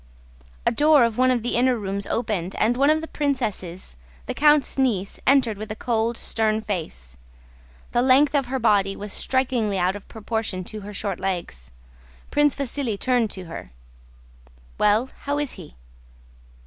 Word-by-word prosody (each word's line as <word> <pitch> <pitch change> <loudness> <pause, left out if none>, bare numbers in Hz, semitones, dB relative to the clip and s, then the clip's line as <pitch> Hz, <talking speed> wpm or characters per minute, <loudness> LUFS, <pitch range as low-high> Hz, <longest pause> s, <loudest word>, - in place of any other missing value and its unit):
A - - +4
door 300 -3 +5
of 230 0 0
one 255 0 +5
of 245 -3 +1
the 240 - -1
inner 250 +1 +3
rooms 200 -1 -4
opened 205 -6 -2
and 230 +3 +2
one 275 +3 +3
of 310 +1 +3
the 320 - -6
princesses, 215 - -3 0.3
the - - -3
count's 295 -2 +3
niece, 210 -7 0
entered 250 -7 +3
with 215 0 -6
a - - -4
cold, 230 0 -1
stern 220 -1 0
face. 65 - -5 0.7
The 240 - +2
length 265 +3 +4
of 275 -3 +1
her 265 +2 -2
body 205 -5 +2
was 205 0 -7
strikingly 245 -6 0
out 185 +1 +1
of 205 - -10
proportion 220 -3 -3
to 215 +4 -8
her 205 +1 -8
short 200 -2 -3
legs. 175 - -4 0.6
Prince 295 -1 +3
Vasíli 265 -6 -3
turned 245 -4 +2
to 190 -2 -8
her. 165 - -8 1.1
"Well, 215 +5 +3
how 285 0 0
is 290 -2 -2
he?" - - -11
225 Hz, 165 wpm, -23 LUFS, 200-260 Hz, 1.1 s, door